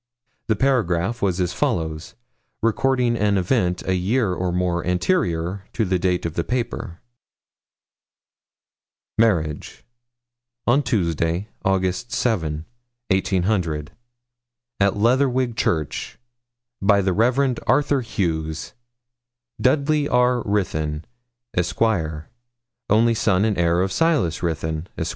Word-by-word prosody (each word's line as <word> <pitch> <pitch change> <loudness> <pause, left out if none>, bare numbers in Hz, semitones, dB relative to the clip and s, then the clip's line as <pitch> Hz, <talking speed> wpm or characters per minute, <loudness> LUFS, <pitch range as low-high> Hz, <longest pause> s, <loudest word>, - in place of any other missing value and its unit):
The 110 - +2
paragraph 115 -4 +1
was 95 -2 0
as 90 -1 0
follows, 80 -1 -2 0.5
recording 125 +1 +2
an 105 -3 +2
event 90 -2 0
a 95 - +2
year 95 +3 +1
or 90 0 -1
more 90 -1 0
anterior 90 - 0
to 110 - 0
the 95 -1 0
date 90 -1 0
of 85 - -2
the 85 - -1
paper: 115 -7 -3 2.2
'MARRIAGE. 85 -10 0 0.8
On 130 +5 +4
Tuesday, 85 - -1
August 95 +3 0
7, 80 -10 -1 0.5
18, 95 -1 +1 1.4
at 100 0 +2
Leatherwig 125 +2 +2
Church, 80 -8 -2 0.6
by 100 0 +4
the 95 -1 +1
Rev. 125 +4 +2
Arthur 135 +2 +3
Hughes, 80 -8 -3 0.9
Dudley 145 +2 +2
R. 125 0 +3
Ruthyn, 80 -8 -1 0.5
Esq., 90 0 -1 1.1
only 115 +3 +4
son 105 -3 +2
and 110 -2 +1
heir 85 0 +2
of 95 0 0
Silas 150 - +1
Ruthyn, 80 0 -2
Esq. - - -2
95 Hz, 105 wpm, -22 LUFS, 85-120 Hz, 2.2 s, On